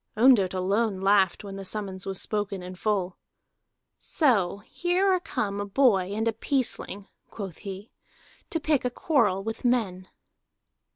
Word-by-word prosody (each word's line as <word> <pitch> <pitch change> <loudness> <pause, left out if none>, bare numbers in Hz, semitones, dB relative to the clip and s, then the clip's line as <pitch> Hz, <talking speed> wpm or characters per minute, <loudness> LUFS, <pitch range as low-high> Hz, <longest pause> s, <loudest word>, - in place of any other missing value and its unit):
Ondott 215 -6 +5
alone 195 +2 0
laughed 195 0 +3
when 195 -1 -7
the 195 - -6
summons 190 -1 -5
was 195 -1 -2
spoken 205 -3 -3
in 180 +1 -7
full. 190 -1 -1 0.8
"So 200 - +1
here 365 +2 +1
are 370 - +2
come 205 - -3
a - - -3
boy 200 -5 +3
and 220 +1 -1
a 225 - +1
peaceling," 225 -5 -1 0.2
quoth 195 -6 -7
he, 200 +1 -8 0.6
"to 325 - -1
pick 300 -3 +1
a 250 - +1
quarrel 245 - +1
with 225 +1 -5
men." 205 -7 0
205 Hz, 150 wpm, -26 LUFS, 190-240 Hz, 0.8 s, Ondott